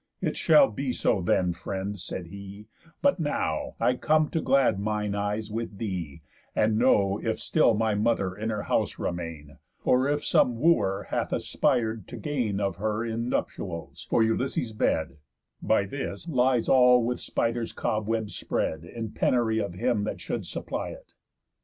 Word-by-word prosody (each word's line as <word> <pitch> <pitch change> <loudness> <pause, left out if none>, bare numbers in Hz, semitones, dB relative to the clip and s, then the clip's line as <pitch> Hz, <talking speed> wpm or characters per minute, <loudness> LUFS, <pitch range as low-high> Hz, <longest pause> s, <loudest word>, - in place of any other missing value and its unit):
"It - - -1
shall 285 -2 +6
be 135 -2 -2
so 100 - +1
then, 90 0 +2
friend," 95 +3 -4
said 90 0 -6
he, 100 +3 -10 0.4
"but 280 -8 +3
now 115 - -1
I 125 - +3
come 155 +2 +2
to 165 - -1
glad 135 -7 +3
mine 105 0 -1
eyes 105 +1 -2
with 115 -2 -4
thee, 90 -8 -4 0.3
and 110 0 +2
know 100 -5 +3
If 110 -1 -1
still 135 -8 +3
my 110 0 +1
mother 105 -3 +1
in 110 +2 -3
her 105 -2 -2
house - - 0
remain, 80 -4 -5 0.3
Or 130 +2 +4
if 145 +1 0
some 120 -2 +3
Wooer 110 - +2
hath - - 0
aspir'd 110 -5 0
to 120 - -8
gain 115 -4 -1
Of 100 -4 -1
her 110 +2 -1
in 115 +1 -2
nuptials; 85 -8 -4
for 115 - +4
Ulysses' 115 0 -1
bed, 80 -6 0 0.4
By 105 -2 +2
this, 135 - -5
lies 125 -5 +2
all 125 -2 +6
with 125 +1 -1
spiders's 115 0 -1
cobwebs 110 0 -2
spread, 80 0 -2
In 110 +4 -6
penury 115 -3 +1
of 100 -4 -3
him 115 +1 0
that - - -4
should - - -4
supply - - -4
it." - - -12
110 Hz, 165 wpm, -27 LUFS, 100-125 Hz, 0.4 s, shall